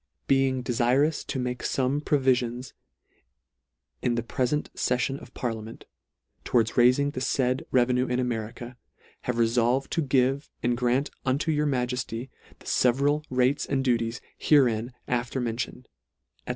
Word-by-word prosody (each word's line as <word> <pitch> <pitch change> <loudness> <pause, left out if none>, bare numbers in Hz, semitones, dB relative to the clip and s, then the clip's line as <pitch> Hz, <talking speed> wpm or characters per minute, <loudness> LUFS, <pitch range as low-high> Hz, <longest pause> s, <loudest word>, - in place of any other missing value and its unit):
being 135 -1 +2
defirous 125 +5 +2
to - - -4
make 125 -1 -2
fome 135 +2 0
provifion 125 -4 +1 1.4
in 120 -2 +1
the 120 - -1
prefent 130 +5 -1
feifion 130 +2 -1
of - - -13
parliament, 115 -2 -5 0.6
towards 115 -2 +2
raifing 130 +4 +3
the 130 - -4
faid 130 -1 0
revenue 125 0 +2
in 125 0 0
America, 120 0 -4 0.5
have 125 -1 -1
refolved 120 +3 +2
to 165 - +1
give 135 0 +1
and 120 0 +2
grant 125 +3 0
unto 140 +5 0
your 150 0 +1
Ma 130 -3 +1
jefty 125 0 -4 0.3
the - - -19
feveral 140 +4 +2
rates 130 +2 +2
and 135 -1 0
duties 120 -1 0 0.2
herein 120 -5 +3 0.2
after 125 +1 -1
mentioned," 120 +1 -4 0.6
&c. - - -7
125 Hz, 140 wpm, -26 LUFS, 120-135 Hz, 1.4 s, raifing